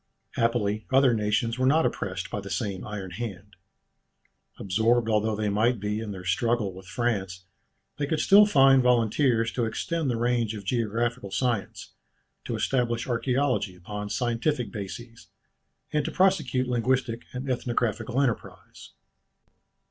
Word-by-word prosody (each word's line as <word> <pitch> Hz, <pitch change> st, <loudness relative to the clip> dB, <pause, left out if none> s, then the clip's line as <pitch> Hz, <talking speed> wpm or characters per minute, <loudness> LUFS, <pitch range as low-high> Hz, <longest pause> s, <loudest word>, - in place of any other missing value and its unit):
Happily 110 Hz, -3 st, 0 dB
other 130 Hz, -1 st, +5 dB
nations 110 Hz, +2 st, 0 dB
were 130 Hz, -, +3 dB
not 155 Hz, +4 st, +4 dB
oppressed 95 Hz, -1 st, -3 dB
by -, -, -2 dB
the 100 Hz, -, -9 dB
same 95 Hz, 0 st, -3 dB
iron 100 Hz, -3 st, -6 dB
hand. 100 Hz, -1 st, -7 dB, 1.0 s
Absorbed 110 Hz, +4 st, +1 dB
although 110 Hz, 0 st, +1 dB
they 105 Hz, 0 st, -1 dB
might 110 Hz, +3 st, +1 dB
be 105 Hz, +1 st, -2 dB
in 110 Hz, -1 st, -5 dB
their 95 Hz, -3 st, -7 dB
struggle 105 Hz, +2 st, 0 dB
with 95 Hz, 0 st, -12 dB
France, 95 Hz, -4 st, -2 dB, 0.5 s
they 145 Hz, -, 0 dB
could 155 Hz, +1 st, 0 dB
still 205 Hz, +1 st, +7 dB
find 135 Hz, -7 st, +6 dB
volunteers 115 Hz, -1 st, +2 dB
to 120 Hz, 0 st, -1 dB
extend 150 Hz, +7 st, -2 dB
the 120 Hz, -, 0 dB
range 120 Hz, -2 st, 0 dB
of 105 Hz, -, -7 dB
geographical 115 Hz, 0 st, -1 dB
science, 115 Hz, -1 st, -2 dB, 0.5 s
to -, -, -3 dB
establish 120 Hz, -3 st, 0 dB
archæology 125 Hz, -5 st, 0 dB
upon 105 Hz, +3 st, -6 dB
scientific 120 Hz, +4 st, -1 dB
bases, 115 Hz, +3 st, -8 dB, 0.7 s
and 150 Hz, -1 st, +2 dB
to -, -, -3 dB
prosecute 155 Hz, -10 st, +2 dB
linguistic 125 Hz, -1 st, 0 dB
and 130 Hz, +1 st, -6 dB
ethnographical 120 Hz, 0 st, -1 dB
enterprise. 130 Hz, -5 st, -3 dB
115 Hz, 140 wpm, -26 LUFS, 105-125 Hz, 1.0 s, still